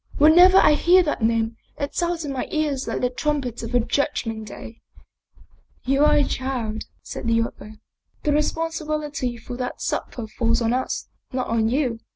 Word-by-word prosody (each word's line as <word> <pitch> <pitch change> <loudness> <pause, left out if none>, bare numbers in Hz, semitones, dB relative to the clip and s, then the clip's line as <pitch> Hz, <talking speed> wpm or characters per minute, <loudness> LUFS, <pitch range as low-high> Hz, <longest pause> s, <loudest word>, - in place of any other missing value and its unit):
Whenever 350 +5 +7
I 305 - +6
hear 360 +4 +5
that 295 -7 -2
name, 225 0 +1 0.2
it 285 0 -3
sounds 345 -2 -1
in 280 - -3
my 260 - -3
ears 295 -4 -1
like - - -2
the 250 - +2
trumpet 270 -3 -2
of 230 0 -6
the 245 - +3
judg 285 +4 -1
ment 220 -1 -5
day." 225 +2 -10 0.5
" - - -31
You 275 +3 +3
are - - +5
a 290 - +4
child," 250 -6 -3 0.2
said - - -6
the 230 0 +3
other. 215 -1 -8 0.2
" - - -43
The 300 - +1
responsibility 300 -4 -2
for 240 +1 -8
that 250 -1 -4
supper 235 - -3
falls 230 +1 0
on 230 0 +1
us, 255 +1 -2 0.2
not 255 -1 -1
on 225 -1 +1
you. 250 -3 0
260 Hz, 190 wpm, -23 LUFS, 230-300 Hz, 0.5 s, Whenever